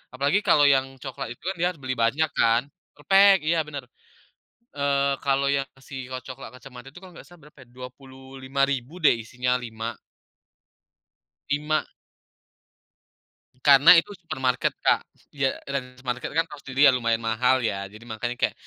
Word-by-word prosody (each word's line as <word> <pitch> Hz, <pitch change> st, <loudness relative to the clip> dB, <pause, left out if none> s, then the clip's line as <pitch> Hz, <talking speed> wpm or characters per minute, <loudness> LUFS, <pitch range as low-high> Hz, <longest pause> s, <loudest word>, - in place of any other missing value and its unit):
Apalagi, 140 Hz, +9 st, +2 dB
kalau 145 Hz, -, +5 dB
yang 135 Hz, -1 st, +3 dB, 0.2 s
coklat 135 Hz, -2 st, -6 dB
itu -, -, -45 dB
kan, -, -, -8 dB
dia 175 Hz, -, +2 dB
harus 160 Hz, -6 st, -17 dB
beli 130 Hz, 0 st, -3 dB
banyak 135 Hz, +8 st, +1 dB
kan 115 Hz, +1 st, +3 dB, 0.3 s
per-pack! 195 Hz, +6 st, +5 dB
iya 165 Hz, 0 st, +2 dB
benar. 145 Hz, -4 st, -8 dB, 0.9 s
Eee, 140 Hz, -1 st, +1 dB
kalau 140 Hz, 0 st, +1 dB
yang, 135 Hz, -1 st, 0 dB
si 135 Hz, -1 st, -9 dB
ko 130 Hz, -, -4 dB
coklat 130 Hz, -3 st, -9 dB
kacamata 125 Hz, 0 st, -13 dB
itu, 145 Hz, -, -24 dB
nggak 180 Hz, -2 st, -13 dB
salah, 175 Hz, -1 st, -17 dB
berapa 150 Hz, -, -20 dB
ya, -, -, -16 dB
Rp25.000 130 Hz, +2 st, -4 dB
deh -, -, +7 dB
isinya 125 Hz, +2 st, -2 dB
5. 115 Hz, -1 st, -6 dB, 1.6 s
5. 150 Hz, +2 st, 0 dB, 1.8 s
Karena 140 Hz, +2 st, +8 dB
itu 165 Hz, -, -7 dB
supermarket 130 Hz, -9 st, -2 dB
Kak -, -, +4 dB, 0.3 s
iya. 135 Hz, -2 st, -1 dB
Dan 125 Hz, -2 st, -5 dB
supermarket 130 Hz, -1 st, -4 dB
kan, 165 Hz, -, +3 dB
tau 150 Hz, -, -10 dB
sendiri 135 Hz, +1 st, +2 dB
ya, -, -, +7 dB
lumayan 115 Hz, -2 st, +1 dB
mahal 125 Hz, +3 st, +2 dB
ya. 100 Hz, -3 st, -3 dB
Jadi, 110 Hz, +3 st, -14 dB
makanya 120 Hz, +1 st, -4 dB
kayak, -, -, +1 dB
135 Hz, 155 wpm, -24 LUFS, 125-145 Hz, 1.8 s, Karena